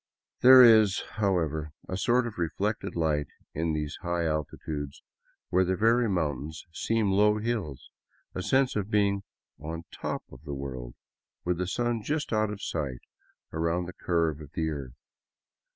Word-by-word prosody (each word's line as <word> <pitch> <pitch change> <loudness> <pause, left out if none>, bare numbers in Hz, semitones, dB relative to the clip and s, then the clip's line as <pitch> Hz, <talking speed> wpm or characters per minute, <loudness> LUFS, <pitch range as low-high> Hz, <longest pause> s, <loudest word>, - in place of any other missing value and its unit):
There 130 +1 +10
is, 110 -4 +6
however, 80 -7 0
a 95 - -3
sort 120 +6 +2
of 110 -5 -6
reflected 100 +6 -2
light 75 -3 +1 0.3
in 80 +1 -1
these 75 -1 -3
high 85 -1 -1
altitudes, 75 -2 -4 0.5
where 95 +1 +3
the 95 +1 +1
very 115 +4 +3
mountains 75 -4 -2
seem 110 +1 +1
low 105 +2 +4
hills, 105 - -3 0.4
a 90 - -3
sense 130 +6 +2
of 105 -1 -1
being 100 -2 +2 0.4
on 80 +2 -5
top - - -4
of 65 - -12
the 70 -2 -5
world, 65 -3 -6 0.5
with 90 0 0
the 90 - -1
sun 120 +2 -1
just 145 +3 -2
out 110 -1 +2
of 105 -1 -6
sight 70 -7 -3 0.5
around 85 +2 0
the 90 - -8
curve 80 -4 0
of 75 0 -12
the 80 -1 -1
earth. 70 -5 -6
90 Hz, 155 wpm, -28 LUFS, 75-105 Hz, 0.5 s, There